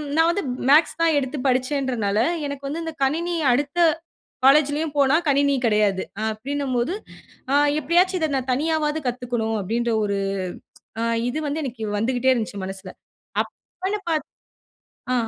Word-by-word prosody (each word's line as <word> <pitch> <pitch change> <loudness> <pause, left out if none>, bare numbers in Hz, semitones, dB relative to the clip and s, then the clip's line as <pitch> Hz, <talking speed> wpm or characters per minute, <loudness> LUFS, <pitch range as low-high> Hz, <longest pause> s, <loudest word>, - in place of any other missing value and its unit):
நான் 325 +1 +4
வந்து 400 +1 -2 0.3
மேத்ஸ் 315 +2 +5
தான் 325 -2 +4
எடுத்து 275 +2 -4
படிச்சேன்றதனால 255 -5 0 0.3
எனக்கு 280 -1 -6
வந்து 325 +4 -3
இந்த 325 - -4
கணினி 335 +6 0 0.2
அடுத்த 285 +6 -1 0.7
காலேஜ்லேயும் 295 +2 +4
போனா 280 +1 +4
கணினி 280 0 +3
கிடையாது 210 -3 +2 0.2
அப்டின்னும் 260 +5 -3
போது 245 +10 0 0.6
ஆ - - +3 0.2
எப்டியாச்சு 350 +6 +2
இத 315 - +1
நான் 260 -1 -2
தனியாவது 310 +2 0
கத்துக்கணும் 240 -3 -2
அப்டின்ற 235 +5 -1
ஒரு 200 -1 0 0.8
ஆ - - 0 0.3
இது 300 +5 -2
வந்து 300 +2 -2
எனக்கு 235 -5 -5
வந்துக்குட்டே 250 +4 +2
இருந்துச்சு 215 -4 -3
மனசுல. 190 -1 -7 0.5
அப்பன்னு 385 +3 -6
பாத் 310 -3 0 0.8
அ - - +2
275 Hz, 135 wpm, -23 LUFS, 235-310 Hz, 0.8 s, மேத்ஸ்